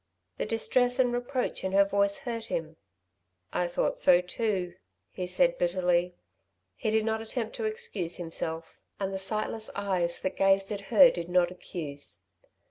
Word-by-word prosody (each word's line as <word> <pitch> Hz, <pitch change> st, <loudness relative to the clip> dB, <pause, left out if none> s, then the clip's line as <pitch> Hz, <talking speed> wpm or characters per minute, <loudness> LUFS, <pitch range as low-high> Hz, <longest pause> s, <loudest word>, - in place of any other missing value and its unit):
The -, -, -1 dB
distress 245 Hz, +3 st, +2 dB
and 250 Hz, -2 st, +3 dB
reproach 245 Hz, +1 st, -2 dB
in 190 Hz, 0 st, -2 dB
her 200 Hz, 0 st, +6 dB
voice 200 Hz, 0 st, +2 dB
hurt 230 Hz, -3 st, -5 dB
him. 160 Hz, 0 st, -4 dB, 0.8 s
"I 180 Hz, -, +1 dB
thought 175 Hz, -, -1 dB
so 180 Hz, -1 st, +6 dB
too," 180 Hz, -1 st, -2 dB, 0.4 s
he 180 Hz, -, -4 dB
said 255 Hz, +8 st, +2 dB
bitterly. 175 Hz, 0 st, +1 dB, 0.6 s
He 215 Hz, -, -2 dB
did 220 Hz, 0 st, +2 dB
not 220 Hz, 0 st, 0 dB
attempt 225 Hz, 0 st, -4 dB
to 450 Hz, -, -2 dB
excuse 430 Hz, -, -2 dB
himself; 165 Hz, -1 st, -4 dB, 0.2 s
and 195 Hz, -1 st, -2 dB
the 190 Hz, -, -3 dB
sightless 215 Hz, +2 st, -2 dB
eyes 185 Hz, -4 st, -1 dB
that 185 Hz, -, -2 dB
gazed 195 Hz, +1 st, +3 dB
at 205 Hz, -1 st, -3 dB
her 270 Hz, -3 st, +8 dB
did 170 Hz, 0 st, -5 dB
not 180 Hz, -1 st, +3 dB
accuse. 150 Hz, -5 st, -6 dB
195 Hz, 160 wpm, -29 LUFS, 175-225 Hz, 0.8 s, her